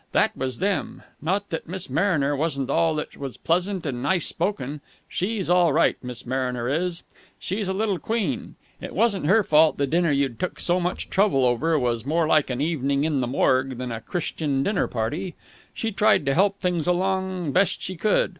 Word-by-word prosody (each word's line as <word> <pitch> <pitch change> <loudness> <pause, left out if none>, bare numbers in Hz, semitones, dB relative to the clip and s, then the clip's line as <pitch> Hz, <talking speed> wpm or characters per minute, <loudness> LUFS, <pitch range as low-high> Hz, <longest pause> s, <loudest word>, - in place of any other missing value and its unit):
That - - +2
was 130 -2 -3
them! 200 0 -2 0.2
Not 195 +6 -1
that 165 - -4
Miss 185 +1 -3
Mariner 155 -6 +1
wasn't 140 -3 -1
all 165 -1 +2
that 150 - -5
was 135 -3 -6
pleasant 180 +2 0
and 125 -4 -3
nice 170 +5 +2
spoken. 145 -7 -2 0.3
She's 195 +1 -2
all 175 -3 +4
right, - - +3
Miss 125 -1 -6
Mariner 125 -1 -2
is. 170 +5 -1 0.3
She's 200 +2 -2
a 190 - 0
little 200 -2 0
queen. 215 - -2 0.3
It - - -7
wasn't 200 -6 +2
her 215 +5 +5
fault 155 -2 +4
the 140 - +1
dinner 170 +4 +1
you'd 140 -4 0
took 185 - -3
so 175 +1 +2
much 180 +1 -3
trouble 190 -10 +3
over 150 +7 +2
was 120 -4 0
more 160 +5 +1
like 155 -2 +3
an 125 +1 -2
evening 140 -3 0
in 150 -4 +1
the 125 - -1
Morgue 130 0 +1
than 125 -1 -4
a 115 0 -5
Christian 150 -3 -2
dinner 200 +2 0
party. 150 +11 -3 0.4
She 225 - -3
tried 205 -5 +3
to 135 - +2
help 200 +4 +2
things 175 -3 0
along 185 -2 0
best 185 +6 +2
she 185 - -3
could. 205 +5 +2
165 Hz, 190 wpm, -24 LUFS, 135-190 Hz, 0.4 s, her